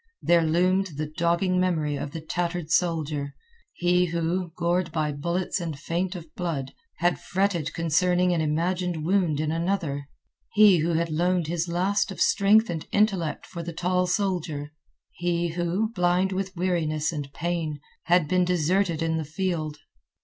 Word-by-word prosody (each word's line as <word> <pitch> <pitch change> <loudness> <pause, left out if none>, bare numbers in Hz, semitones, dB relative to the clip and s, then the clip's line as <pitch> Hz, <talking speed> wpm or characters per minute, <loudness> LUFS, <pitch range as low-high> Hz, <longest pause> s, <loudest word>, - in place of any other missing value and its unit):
There 170 0 +5
loomed 180 +1 +1
the 155 - -1
dogging 170 +4 +1
memory 160 -5 +1
of 145 - -4
the 160 +3 -7
tattered 170 0 -3
soldier—he 175 - -1
who, 170 +1 -1
gored 175 0 0
by 155 -2 0
bullets 170 +6 -2
and 160 -4 -4
faint 175 +5 -2
of 165 -3 -9
blood, 150 -7 -3 0.2
had 175 +2 +1
fretted 185 -5 0
concerning 180 +2 +2
an 165 - +1
imagined 170 +1 -1
wound 175 -5 +2
in 155 0 0
another; 165 -5 -1 0.5
he 210 -3 +7
who 165 +2 +1
had 165 0 0
loaned 175 +2 +1
his 170 +2 -1
last 190 +5 0
of - - -8
strength 210 +3 +4
and 165 -3 -4
intellect 195 -6 +1
for 170 - -7
the 170 0 -6
tall 180 +2 0
soldier; 175 -6 -1 0.4
he 175 -1 -1
who, 175 +6 -1
blind 180 -1 +2
with 190 0 -3
weariness 165 -4 0
and 145 -3 -5
pain, 165 -1 -2 0.3
had 175 -3 +3
been 180 +2 +2
deserted 180 0 +1
in 160 0 0
the 160 - -2
field. 155 -1 -3
170 Hz, 155 wpm, -26 LUFS, 160-180 Hz, 0.5 s, he